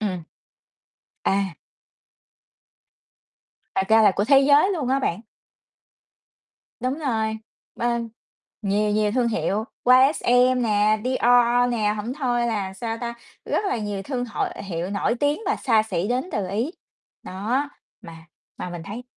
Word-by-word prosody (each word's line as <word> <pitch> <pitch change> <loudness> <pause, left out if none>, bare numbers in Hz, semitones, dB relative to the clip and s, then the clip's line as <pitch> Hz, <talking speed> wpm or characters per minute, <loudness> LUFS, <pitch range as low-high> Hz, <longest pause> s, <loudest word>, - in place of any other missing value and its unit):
Ừm. 185 -5 -2 1.0
À. 195 -4 0 2.2
Thật 190 0 0
ra 220 0 +6
là 210 - +6
của 205 - +2
thế 275 +3 +6
giới 290 +7 +5
luôn 300 -9 -2
á 270 +1 +2
bạn. 200 -6 -1 1.6
Đúng 255 +5 -2
rồi, 220 -6 -1 0.4
bên 235 -1 -1 0.5
nhiều 210 +1 +1
nhiều 210 0 +1
thương 245 -1 +1
hiệu, 215 -1 -1 0.2
YSL 255 -1 +5
nè, 215 -1 +2
Dior 245 -1 +3
nè, 210 -3 0
hổng 215 +4 -4
thôi 245 -4 0
là, 205 -5 -2
sao 225 +3 -4
ta, 235 -1 -4 0.3
rất - - -1
là 390 - 0
nhiều 205 -2 -4
thương 250 +1 -3
hội 230 - -2 0.2
hiệu 175 -1 -4
nổi 205 +3 0
tiếng 290 +5 +1
và - - +1
xa 225 -5 +2
xỉ 195 -3 -2
đến 250 +3 0
từ 200 -3 -2
Ý. 225 - -1 0.5
Đó, 230 +10 -2 0.3
mà 165 -1 -12 0.3
mà 180 - -6
mình 175 -1 -7
thấy 210 +7 -7
225 Hz, 145 wpm, -23 LUFS, 205-250 Hz, 2.2 s, ra